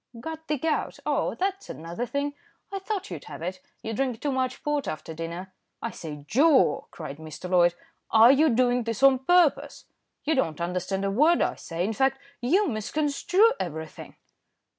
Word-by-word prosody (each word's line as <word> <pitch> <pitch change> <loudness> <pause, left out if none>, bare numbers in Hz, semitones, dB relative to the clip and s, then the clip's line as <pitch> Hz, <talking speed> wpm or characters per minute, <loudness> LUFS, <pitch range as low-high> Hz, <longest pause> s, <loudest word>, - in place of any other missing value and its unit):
"Got 320 +5 -7
the 300 - 0
gout. 315 +3 -1
Oh! - - 0
that's 390 +1 -2
another 170 +9 -5
thing. 285 +3 -2 0.4
I 395 - -3
thought 385 - -4
you'd 160 -4 -7
have - - -8
it. 185 +1 -4 0.2
You 225 - -3
drink 255 -1 -1
too 290 - -1
much 260 -1 -2
port 295 -2 -1
after 155 +1 -5
dinner." 170 +4 -6 0.3
"I 230 - -4
say, 150 -3 -8
Joe," 280 - +4
cried 150 -4 -8
Mr. 160 +3 -8
Loyd, 175 -1 +4 0.3
"are 225 +2 +8
you 305 +3 +4
doing 245 +1 +2
this 230 +2 -3
on 270 -1 +7
purpose? 345 +3 +2 0.4
You 315 - +1
don't 165 - 0
understand 180 +3 -2
a 195 - 0
word 305 +11 +4
I - - 0
say; 170 +1 -4
in 220 - -1
fact, 270 +4 +2 0.2
you 365 +12 +3
misconstrue 300 - +2
everything." 160 -3 -6
245 Hz, 175 wpm, -26 LUFS, 180-295 Hz, 0.4 s, are